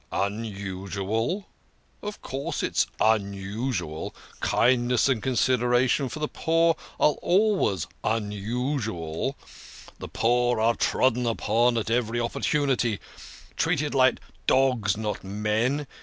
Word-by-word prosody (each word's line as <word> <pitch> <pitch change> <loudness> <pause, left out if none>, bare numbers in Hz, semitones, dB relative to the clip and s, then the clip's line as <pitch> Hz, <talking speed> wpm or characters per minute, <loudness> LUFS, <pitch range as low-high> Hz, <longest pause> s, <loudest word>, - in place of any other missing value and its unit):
" - - -38
Unusual! 100 - -2 0.6
Of 210 0 -7
course, 135 +1 -3
it's - - +1
unusual. 100 - -1 0.2
Kindness 120 0 +3
and 130 -5 +1
con 130 +2 -1
sideration 125 +2 +2
for 135 - -6
the 150 0 -1
poor 165 +1 +2 0.2
are 150 - +5
always 185 - +2 0.2
unusual. 110 - -2 0.6
The - - -6
poor 120 0 +2
are 115 +1 +3
trodden 125 0 +1
upon 115 +1 +2
at 110 0 -2
every 120 0 +1
opportunity, 120 -1 0 0.6
treated - - 0
like - - +4 0.3
dogs, 125 -7 +3
not 105 -1 -3
men. 105 +8 0
115 Hz, 110 wpm, -26 LUFS, 105-130 Hz, 0.6 s, are